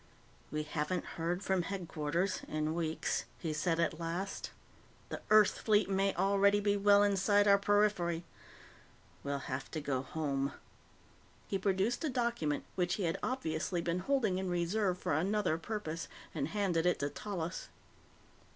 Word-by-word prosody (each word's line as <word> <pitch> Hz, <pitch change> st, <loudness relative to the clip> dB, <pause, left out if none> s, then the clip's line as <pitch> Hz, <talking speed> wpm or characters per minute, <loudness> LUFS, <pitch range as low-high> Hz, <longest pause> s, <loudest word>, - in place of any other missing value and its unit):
"We 150 Hz, +1 st, -2 dB
haven't 150 Hz, +4 st, -2 dB, 0.2 s
heard 175 Hz, +3 st, -1 dB
from 190 Hz, -2 st, +1 dB
Headquarters 175 Hz, -1 st, -2 dB
in 155 Hz, 0 st, -1 dB
weeks," 165 Hz, -1 st, -1 dB
he 160 Hz, -2 st, -3 dB
said 165 Hz, +2 st, 0 dB
at 165 Hz, -1 st, 0 dB
last. 175 Hz, +4 st, -3 dB, 0.6 s
"The -, -, -5 dB
Earth 215 Hz, -1 st, +6 dB
fleet 210 Hz, -2 st, +3 dB
may 195 Hz, 0 st, +2 dB
already 200 Hz, +1 st, +4 dB
be 205 Hz, 0 st, +2 dB
well 205 Hz, 0 st, +5 dB
inside 205 Hz, +1 st, +3 dB
our 200 Hz, 0 st, +6 dB
periphery. 200 Hz, -5 st, +2 dB, 1.0 s
We'll 140 Hz, 0 st, -1 dB
have 135 Hz, 0 st, -4 dB
to 160 Hz, -, -3 dB
go 140 Hz, -3 st, -1 dB
home." 140 Hz, -1 st, -2 dB, 0.9 s
He 195 Hz, -, -1 dB
produced 195 Hz, -, +1 dB
a 310 Hz, -, +1 dB
document 235 Hz, -, 0 dB
which 180 Hz, 0 st, 0 dB
he 200 Hz, -, -3 dB
had 165 Hz, -1 st, 0 dB
obviously 175 Hz, -8 st, -1 dB
been 170 Hz, +1 st, -1 dB
holding 215 Hz, -4 st, +1 dB
in 190 Hz, -1 st, -2 dB
reserve 180 Hz, +2 st, +1 dB
for -, -, -1 dB
another 180 Hz, +1 st, +1 dB
purpose 165 Hz, -4 st, -4 dB, 0.3 s
and 145 Hz, -3 st, -1 dB
handed 180 Hz, -3 st, +1 dB
it 180 Hz, -, +3 dB
to 145 Hz, -, -1 dB
Tallis. 185 Hz, -4 st, -4 dB
180 Hz, 150 wpm, -33 LUFS, 160-200 Hz, 1.0 s, Earth